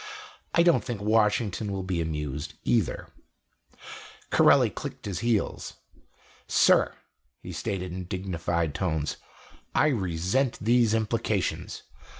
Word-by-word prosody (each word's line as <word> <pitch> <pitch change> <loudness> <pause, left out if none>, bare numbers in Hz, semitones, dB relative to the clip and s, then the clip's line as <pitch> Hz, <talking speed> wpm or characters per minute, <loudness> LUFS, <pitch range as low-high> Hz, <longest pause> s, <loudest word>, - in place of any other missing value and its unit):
I 170 - +6
don't 170 -1 +4
think 120 -5 -4
Washington 105 -1 +1
will 95 -1 -3
be 90 -2 -1
amused, 75 -3 -4
either." - - 0 1.2
Corelli - - +5
clicked - - -7
his 95 -5 -3
heels. 115 -3 -1 0.7
"Sir," - - +4 0.5
he - - -7
stated 90 -2 -3
in 90 0 -5
dignified 85 -3 -2
tones, 80 -5 -2 0.6
"I 155 - +4
resent 95 - 0
these 115 0 +3
implications. 110 -2 -1
95 Hz, 110 wpm, -27 LUFS, 85-115 Hz, 1.2 s, I